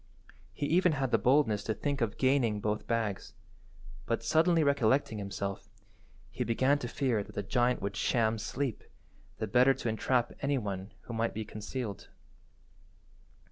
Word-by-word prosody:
He - - -3
even 175 +2 +3
had 135 -3 -1
the - - +4
boldness 125 -6 +3
to 110 - -1
think 140 -2 -2
of 115 -3 -1
gaining 130 -5 +2
both 105 +1 -2
bags, 110 -4 -2 0.7
but, 115 -1 -1
suddenly 160 +6 +3
recollecting 135 -4 +2
himself, 100 0 -5 0.6
he - - -2
began 130 +5 +2
to 120 - -4
fear 120 -4 0
that - - -15
the 100 - -2
giant 120 +2 +1
would 100 0 -3
sham 110 0 +1
sleep, 125 +2 -3 0.5
the - - -2
better 125 +5 +4
to 120 - -3
entrap 120 +2 0
any 140 0 +1
one 100 -3 -4
who 120 - -8
might 115 0 -1
be 110 0 -3
concealed. 110 0 -6
115 Hz, 155 wpm, -31 LUFS, 105-135 Hz, 0.7 s, the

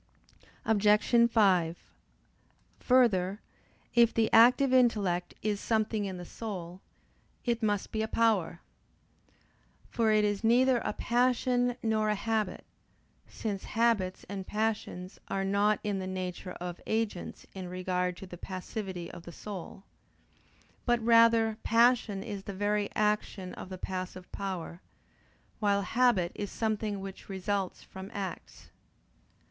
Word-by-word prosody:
Obj. 215 +2 +4
5: 185 -7 +3 1.0
Further, 210 -7 +3 0.5
if 235 -1 +5
the 225 -1 +1
active 250 +4 +6
intellect 205 -8 +2
is 210 -1 0
something 220 -1 0
in 190 -2 -4
the 175 - -7
soul, 185 -5 -7 0.6
it 235 -1 0
must 205 -2 0
be 220 - -1
a 220 - -1
power. 215 -7 +1 1.3
For 225 -2 +2
it 215 -1 +4
is 205 +1 -1
neither 245 +2 +4
a - - -3
passion 245 +1 +1
nor 215 -1 +1
a 210 - +2
habit; 220 +1 -2 0.6
since 205 -4 -4
habits 225 -5 +1
and 195 -1 -6
passions 210 -4 -3
are 195 0 -1
not 200 +2 +2
in 205 -2 -1
the 185 - -4
nature 185 -1 -5
of 175 0 -7
agents 220 -5 -2
in 185 -2 -6
regard 180 0 -2
to - - -8
the 175 -2 -10
passivity 185 -1 -5
of - - -10
the 170 - -10
soul; 195 +1 -8 1.0
but 240 -1 +2
rather 230 -1 +5
passion 230 -4 +3
is 205 -3 -5
the 200 - -6
very 205 +1 0
action 210 -3 -1
of - - -8
the 185 - -6
passive 185 0 -6
power; 185 -3 -5 0.8
while 200 -2 +2
habit 210 -4 +2
is 205 -1 -4
something 215 -2 -2
which 195 +1 -9
results 195 0 -2
from 190 +1 -9
acts. 190 -4 -7
205 Hz, 130 wpm, -30 LUFS, 185-225 Hz, 1.3 s, active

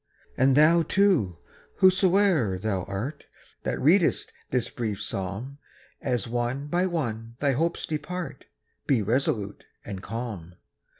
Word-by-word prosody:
And 130 +1 +4
thou, 160 +3 +6
too, 165 - +2 0.4
whosoe'er 185 - +4
thou 95 -2 -2
art, 120 +10 -5 0.4
That - - -2
readest 170 +5 +3 0.2
this 125 -2 0
brief 110 -5 -3
psalm, 100 +9 -5 0.4
As 125 -5 -1
one 120 +4 -2
by 175 +5 +1
one 115 -9 -3
thy 140 +1 +1
hopes 165 +6 0
depart, 155 -2 -5 0.4
Be 125 -7 +3
resolute 105 -3 -1 0.2
and 95 -3 -6
calm. 100 -6 -6
130 Hz, 120 wpm, -26 LUFS, 110-160 Hz, 0.4 s, thou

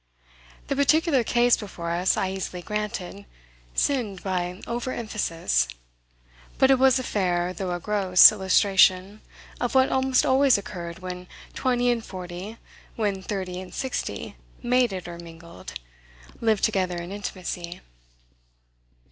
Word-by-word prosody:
The 275 - -2
particular 285 -1 +3
case 240 +1 +3
before 175 -5 -6
us, 175 +2 +1
I 190 - 0
easily 185 -2 -5
granted, 205 -1 -5 0.5
sinned 230 -9 0
by 180 -1 -2
over 240 +2 -3
emphasis, 165 - -1 0.9
but 265 0 +5
it 265 - +4
was 265 0 +5
a 255 - -2
fair, 180 -5 0
though 185 -1 -4
a 175 - -2
gross, 190 -1 +6
illustration 190 0 +3 0.4
of 245 +1 -2
what 260 0 +4
almost 265 0 +2
always 265 -2 +4
occurred 170 -4 -7
when 180 0 -6 0.3
twenty 245 -1 +1
and 235 -2 -2
forty, 185 +3 -8 0.4
when 205 -4 -1
thirty 185 -2 -4
and 185 - -11
sixty, 255 - -4 0.3
mated 240 -8 +1
or 170 -1 -8
mingled, 170 - -11 0.7
lived 220 -3 +1
together 185 -5 +1
in 170 +1 -6
intimacy. 180 -3 -6
195 Hz, 130 wpm, -25 LUFS, 180-240 Hz, 0.9 s, gross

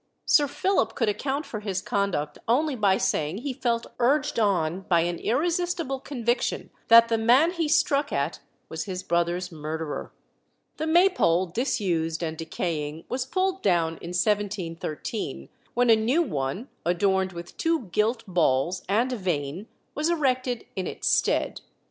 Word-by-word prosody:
Sir 290 -1 +5
Philip 285 - 0
could 230 -4 +1
account 275 +7 -2
for 215 - -5
his 200 -3 -2
conduct 185 -8 -2
only 280 +5 +2
by 200 -4 +3
saying 155 +4 0
he 260 +4 -4
felt 235 -2 -1
urged 285 +2 +2
on 185 -4 +1
by 170 -2 +4
an 175 0 -2
irresistible 335 - 0
conviction 245 -3 -2 0.2
that 230 0 +8
the 225 -1 +1
man 255 +9 +5
he 335 -3 -1
struck 295 -2 +2
at 140 +4 -1 0.3
was 160 - -5
his 185 -2 -5
brother's 175 +1 0
murderer. 155 0 -5 0.7
The 315 - -2
Maypole, 320 - +4
disused 175 - -1
and 160 -1 -2
decaying, 160 -1 -4
was 255 0 -2
pulled 375 +4 0
down 165 -4 +1
in 170 - -8
1713, 175 - -2 0.3
when 245 -1 +4
a - - +8
new 245 +10 +2
one, 150 - -3 0.2
adorned 190 +2 +1
with 170 0 -9
two 330 -1 +1
gilt 225 +5 +1
balls 175 -2 +1
and 235 +6 +2
a - - -2
vane, 175 0 -3 0.3
was 305 +3 0
erected 255 -7 0
in 185 -2 -2
its - - -4
stead. - - +1
210 Hz, 150 wpm, -26 LUFS, 170-265 Hz, 0.7 s, that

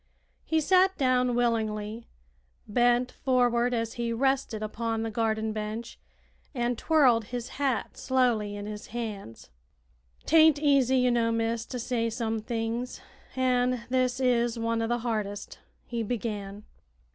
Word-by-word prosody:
He 320 - +1
sat 375 +4 +4
down 250 -2 +2
willingly, 225 -2 -1 0.6
bent 245 +3 +2
forward 245 -2 +1
as 230 -2 -2
he 235 0 -1
rested 260 -2 0
upon 225 +1 -2
the 225 - -3
garden 220 0 -1
bench, 215 +2 -5 0.6
and 240 0 0
twirled 250 -6 +3
his 245 +2 -5
hat 270 -3 -1
slowly 240 -6 +1
in 205 0 -6
his 210 0 -7
hands. 210 - -7 0.7
"'Taint 315 -1 +6
easy, 275 -3 +3
ye 250 -1 +3
know, 230 -1 +2
miss, 230 0 -1
to 255 - -5
say 235 -1 -1
some 225 -1 -2
things, 230 +2 -3 0.4
an' 250 -1 +1
this 255 0 +1
is 240 -2 +2
one 230 0 -1
o' 225 - 0
the 240 +1 0
hardest," 210 -3 -3 0.3
he 235 -1 -3
began. 210 -3 -4
235 Hz, 135 wpm, -28 LUFS, 225-250 Hz, 0.7 s, Taint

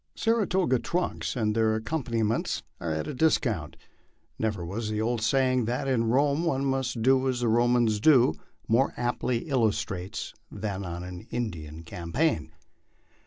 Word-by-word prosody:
Saratoga 190 - +2
trunks 175 +6 -2
and 110 -3 +1
their 110 0 +2
accompaniments 115 -2 -1 0.2
are 85 - -3
at 80 -1 -2
a - - -4
discount. 115 - +1 0.6
Never 105 -6 -1
was 105 +5 -3
the 105 0 -2
old 115 +1 0
saying 130 +1 +2
that 125 +4 -2
in 125 -4 +2
Rome 140 +5 +2
one 140 -5 0
must 130 -4 -1
do 130 +1 +4
as 125 -1 -1
Romans 120 -1 +3
do 125 - +5 0.3
more 120 +5 +2
aptly 120 +1 -1
illustrated 105 - -1 0.2
than 100 -2 -4
on 85 0 -5
an 90 -1 -8
Indian 85 -9 -4
campaign. 85 - -1
115 Hz, 140 wpm, -27 LUFS, 105-130 Hz, 0.6 s, do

